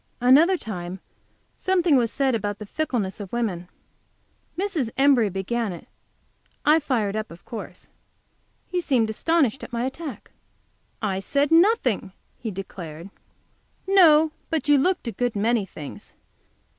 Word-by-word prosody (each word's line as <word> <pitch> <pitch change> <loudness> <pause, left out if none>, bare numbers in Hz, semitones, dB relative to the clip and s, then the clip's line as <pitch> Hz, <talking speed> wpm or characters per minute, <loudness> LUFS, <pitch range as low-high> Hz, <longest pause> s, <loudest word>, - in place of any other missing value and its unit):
Another 295 +10 +5
time 185 - -6 0.6
something 360 -5 +2
was 235 -3 +2
said 270 -2 +1
about 205 -2 -2
the 210 - -8
fickleness 225 -7 -2
of 200 -3 -7
women. 195 -7 -2 0.9
Mrs. 355 - -1
Embury 270 -6 +4
began 200 +4 -2
it. 175 - -10 0.8
I 305 +2 +6
fired 230 -9 -1
up, 215 0 -3
of 170 +1 -14
course. 225 - -8 0.8
He 360 -1 -2
seemed 235 -9 +1
astonished 275 0 +1
at - - -8
my 235 +1 -1
attack. 270 -1 -7 0.7
"I 195 -3 0
said 280 +9 0
nothing," 330 - +3 0.3
he 230 - -4
declared. 180 -3 -8 0.7
"No, 320 -5 +6 0.2
but 315 -4 -1
you 290 -1 +5
looked 360 -1 0
a - - -1
good 240 +2 -2
many 215 0 +1
things. 150 -5 -10
240 Hz, 135 wpm, -24 LUFS, 205-300 Hz, 0.9 s, I